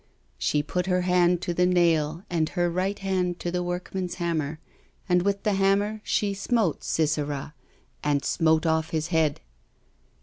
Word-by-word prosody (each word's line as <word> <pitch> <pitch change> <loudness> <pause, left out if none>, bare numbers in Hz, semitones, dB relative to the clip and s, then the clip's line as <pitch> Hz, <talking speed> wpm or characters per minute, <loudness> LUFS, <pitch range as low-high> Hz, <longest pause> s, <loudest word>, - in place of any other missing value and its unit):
She 150 -1 +1
put 180 +4 -2
her 180 -1 +2
hand 180 -1 +3
to 175 - -1
the 180 +1 +3
nail 165 -2 +2
and 160 -3 0
her 175 -2 0
right 190 +3 -1
hand 185 -3 -1
to 175 - -2
the 180 0 -1
workman's 180 +1 -3
hammer, 160 -3 -2 0.5
and 180 -1 +3
with 200 +1 -1
the 210 - +2
hammer 200 +2 +1
she 205 -1 0
smote 200 - 0
Sisera 150 -2 -1 0.5
and 145 -1 +1
smote 160 0 +2
off 160 0 +1
his 160 0 -2
head." 160 -4 +1
175 Hz, 160 wpm, -26 LUFS, 160-185 Hz, 0.5 s, hand